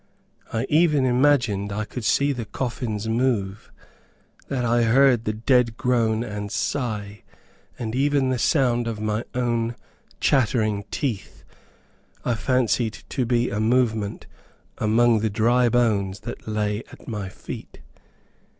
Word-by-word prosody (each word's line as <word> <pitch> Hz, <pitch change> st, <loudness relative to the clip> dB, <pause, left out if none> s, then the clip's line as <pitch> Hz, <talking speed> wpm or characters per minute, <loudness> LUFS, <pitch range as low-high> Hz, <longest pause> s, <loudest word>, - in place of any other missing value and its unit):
I 115 Hz, +2 st, -1 dB
even 150 Hz, -3 st, +3 dB
imagined 125 Hz, -6 st, +2 dB
I 105 Hz, +2 st, -2 dB
could 120 Hz, +3 st, -7 dB
see 140 Hz, +6 st, +2 dB
the 120 Hz, -4 st, -4 dB
coffins 110 Hz, -2 st, -3 dB
move 110 Hz, -4 st, -1 dB, 0.8 s
that 125 Hz, -3 st, -2 dB
I 120 Hz, +1 st, +2 dB
heard 120 Hz, 0 st, +4 dB
the 110 Hz, -, 0 dB
dead 115 Hz, 0 st, +2 dB
groan 115 Hz, -3 st, +1 dB
and 105 Hz, -2 st, -5 dB
sigh 105 Hz, -7 st, -3 dB, 0.6 s
and 110 Hz, -3 st, -4 dB
even 140 Hz, 0 st, +2 dB
the 130 Hz, -1 st, 0 dB
sound 120 Hz, -3 st, +2 dB
of 110 Hz, -2 st, -4 dB
my 110 Hz, +1 st, -1 dB
own 120 Hz, -1 st, 0 dB, 0.4 s
chattering 110 Hz, -6 st, +1 dB
teeth, 115 Hz, -9 st, -4 dB, 0.8 s
I 120 Hz, -, +2 dB
fancied 120 Hz, -2 st, 0 dB
to 125 Hz, -4 st, -1 dB
be 120 Hz, 0 st, +1 dB
a 105 Hz, -, -2 dB
movement 110 Hz, -2 st, 0 dB, 0.5 s
among 115 Hz, +1 st, +3 dB
the 110 Hz, +1 st, 0 dB
dry 120 Hz, +3 st, +3 dB
bones 105 Hz, -5 st, +1 dB
that 120 Hz, +1 st, -8 dB
lay 105 Hz, -1 st, -1 dB
at -, -, -15 dB
my 105 Hz, -5 st, -4 dB
feet. -, -, -9 dB
115 Hz, 130 wpm, -24 LUFS, 105-125 Hz, 0.8 s, heard